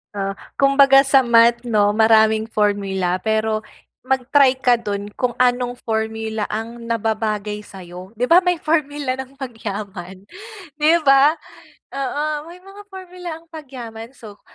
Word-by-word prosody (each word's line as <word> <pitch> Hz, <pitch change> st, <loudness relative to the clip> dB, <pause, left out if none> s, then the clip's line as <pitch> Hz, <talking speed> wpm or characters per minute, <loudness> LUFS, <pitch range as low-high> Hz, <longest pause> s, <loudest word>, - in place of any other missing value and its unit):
Ah, 195 Hz, -1 st, -3 dB, 0.2 s
kumbaga 275 Hz, 0 st, +5 dB
sa 270 Hz, -1 st, +5 dB
math 235 Hz, 0 st, +4 dB
'no, 210 Hz, -3 st, +1 dB
maraming 220 Hz, 0 st, +4 dB
formula. 195 Hz, -4 st, 0 dB
Pero 220 Hz, 0 st, -1 dB, 0.4 s
mag-try 265 Hz, +1 st, +2 dB
ka 245 Hz, -2 st, +2 dB
dun 205 Hz, -1 st, -5 dB
kung 245 Hz, -1 st, -2 dB
anong 245 Hz, 0 st, +1 dB
formula 220 Hz, -1 st, -3 dB
ang 230 Hz, +2 st, -5 dB
nababagay 215 Hz, -2 st, -2 dB
sa'yo. 185 Hz, -2 st, -11 dB
'Di 245 Hz, -, 0 dB
ba 340 Hz, +7 st, +5 dB
may 360 Hz, -1 st, 0 dB
formula 295 Hz, -5 st, -1 dB
ng 265 Hz, +1 st, -9 dB
pagyaman, 200 Hz, -7 st, -7 dB, 0.5 s
'di 305 Hz, +2 st, +3 dB
ba? 275 Hz, +3 st, +5 dB, 0.6 s
Oo, 275 Hz, +2 st, -3 dB, 0.3 s
may 350 Hz, -, -12 dB
mga 390 Hz, +2 st, -14 dB
formula 365 Hz, -2 st, -9 dB
ang 330 Hz, -, -24 dB
pagyaman. 250 Hz, -8 st, -9 dB
So, 210 Hz, -3 st, -13 dB
235 Hz, 130 wpm, -20 LUFS, 215-275 Hz, 0.6 s, kumbaga